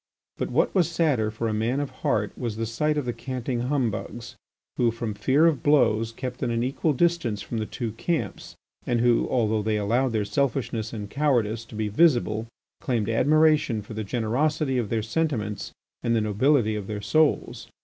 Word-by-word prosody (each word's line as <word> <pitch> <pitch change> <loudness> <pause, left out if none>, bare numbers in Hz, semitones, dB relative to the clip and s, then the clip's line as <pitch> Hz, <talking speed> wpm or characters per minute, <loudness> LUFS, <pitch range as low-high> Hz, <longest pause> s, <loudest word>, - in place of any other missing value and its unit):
But, - - -2
what - - +1
was 180 -4 +3
sadder 150 -10 +1
for 110 +2 -3
a 110 - -1
man 115 +5 0
of 145 -2 -3
heart 105 -2 0
was 115 -4 -4
the 115 +1 -2
sight 150 +7 0
or 145 - 0
the 120 -1 -3
canting 125 0 -4
humbugs, 120 -3 -2 0.4
who, 120 - +3
from 115 -1 -4
fear 135 +9 +3
of 155 -7 +2
blows, 115 -6 +3
kept 125 +2 -6
at 125 - 0
an 115 0 0
equal 140 +4 0
distance 135 - 0
from 115 - -4
the 110 - -3
two 120 -4 -4
camps, 155 +9 -3 0.3
and 120 - +1
who, 120 -1 +3
although 110 -3 +1
they 105 0 0
allowed 120 +5 +1
their 105 -2 0
selfishness 115 -1 -1
and 105 -3 -6
cowardice 120 -7 +1
to 110 - -12
be 110 0 -1
visible, 115 -3 +2 0.3
claimed 120 -8 -1
admiration 145 -2 +3
for 110 - -9
the 110 0 -3
generosity 130 +6 0
of 110 -4 -2
their 110 -2 0
sentiments 110 -6 -2 0.3
and 115 - +1
the 110 - +2
nobility 110 +2 +2
of 105 -2 -5
their 105 -1 -4
souls. 155 +9 +1
120 Hz, 190 wpm, -25 LUFS, 110-140 Hz, 0.4 s, was